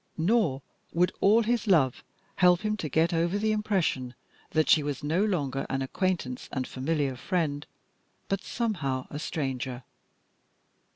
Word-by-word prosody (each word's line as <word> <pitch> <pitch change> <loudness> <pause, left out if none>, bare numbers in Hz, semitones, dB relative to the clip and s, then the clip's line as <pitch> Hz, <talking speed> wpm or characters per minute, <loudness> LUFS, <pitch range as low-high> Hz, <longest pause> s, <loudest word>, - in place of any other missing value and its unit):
Nor 165 - +2 0.3
would 180 +2 +3
all 220 +4 +5
his 235 0 0
love 150 -10 +3 0.3
help 180 -1 +5
him 215 0 0
to 155 -6 -4
get 160 +4 +2
over 170 +4 +1
the 215 +1 +1
impression 190 - 0 0.3
that 155 -1 +2
she 155 - +6
was 145 -2 -4
no 165 +7 +1
longer 145 -10 -1
an 135 0 -1
acquaintance 150 -4 -2
and 130 -2 -2
familiar 140 0 -1
friend, 145 0 -2 0.6
but 195 -1 -1
somehow 160 - -2
a 145 - -4
stranger. 130 -5 -3
160 Hz, 140 wpm, -28 LUFS, 135-195 Hz, 0.6 s, she